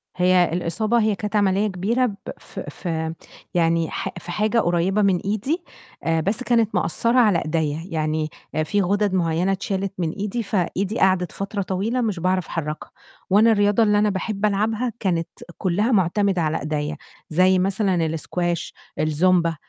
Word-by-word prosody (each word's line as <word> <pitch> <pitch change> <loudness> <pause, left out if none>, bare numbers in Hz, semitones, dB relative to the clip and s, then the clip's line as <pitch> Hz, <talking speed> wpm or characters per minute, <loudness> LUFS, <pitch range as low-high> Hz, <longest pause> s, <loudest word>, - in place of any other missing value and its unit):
هي 180 0 +4
الإصابة، 210 +7 0
هي 215 -1 +2
كانت 210 +2 -4
عملية 200 +1 +2
كبيرة 210 +7 0
ب 210 -5 -3 0.2
في - - -8
في 160 -2 -3 0.4
يعني 165 -1 +2
حا - - -4
في 175 - -8
حاجة 215 +3 +1
قريبة 175 +3 +1
من 195 -3 +3
إيدي، 220 - -2 0.6
بس 210 +9 -1
كانت 230 -4 +2
مأثِّرة 230 +8 +2
على 210 -8 +4
إيديّا، 155 -1 -1
يعني 155 -2 -1 0.3
في 205 +6 0
غُدَد 200 +1 +1
معيّنة 175 +1 +1
اتشالت 195 0 -2
من 170 -3 -1
إيدي، 210 +5 -3
فإيدي 200 +2 -1
قَعَدِت 185 -3 +2
فترة 200 +1 -4
طويلة 200 +7 -1
مش 210 -7 -1
باعرف 185 +1 0
أحرّكها، 155 -2 -5 0.4
وأنا 215 +4 +5
الرياضة 205 +1 +3
اللي 210 -1 +3
أنا 210 0 +3
باحب 200 +1 -2
ألعبها، 220 +4 0
كانت 170 -4 0 0.3
كُلّها 205 +6 +1
معتمدة 190 -1 +2
على 160 +1 0
إيديّا، 150 0 -3 0.3
زي 185 +3 +4
مثلًا 195 0 +1
الاسكواش، 170 +2 -2 0.3
الزومبا، 170 +2 +2
190 Hz, 150 wpm, -22 LUFS, 170-210 Hz, 0.6 s, وأنا